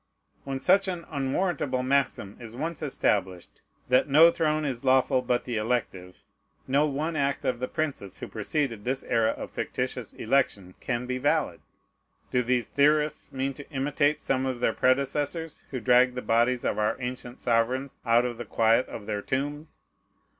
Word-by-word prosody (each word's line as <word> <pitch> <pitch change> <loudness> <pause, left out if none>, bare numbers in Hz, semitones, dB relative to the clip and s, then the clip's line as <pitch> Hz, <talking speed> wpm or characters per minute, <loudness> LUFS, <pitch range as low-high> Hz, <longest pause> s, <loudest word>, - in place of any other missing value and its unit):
When 135 -1 -3
such 195 +6 +4
an 175 -3 -4
unwarrantable 140 -2 -1
maxim 130 -7 0
is 115 -1 -9
once 160 +5 -4
established, 95 - -1 0.3
that 125 +3 +3
no 160 +4 +7
throne 155 -2 0
is 130 -4 -3
lawful 130 0 +3
but 125 -1 0
the 120 -3 -2
elective, 105 -5 -3 0.4
no 140 +3 +3
one 150 +3 -2
act 140 -1 -1
of 125 -2 0
the 125 - -2
princes 140 - -4
who - - -7
preceded 115 0 -2
this 130 +3 -2
era 115 -2 +2
of - - -5
fictitious - - -4
election 110 -7 0
can 120 -1 -2
be 125 0 -3
valid. 145 +3 0 0.7
Do 125 - +2
these 125 0 0
theorists 150 +1 +1
mean 135 +1 -2
to 145 +2 -12
imitate 145 +1 +1
some 135 0 0
of 130 -2 -3
their - - +1
predecessors, 145 +5 0
who 130 - -4
dragged 125 +1 +4
the 125 - -4
bodies 120 +2 +2
of - - 0
our 105 0 +1
ancient 125 -1 -6
sovereigns 125 +3 0
out 120 0 +3
of 120 -2 -3
the 120 - -5
quiet 115 +3 +2
of 105 - -8
their 105 -1 -3
tombs? 145 +6 -4
130 Hz, 170 wpm, -27 LUFS, 120-145 Hz, 0.7 s, no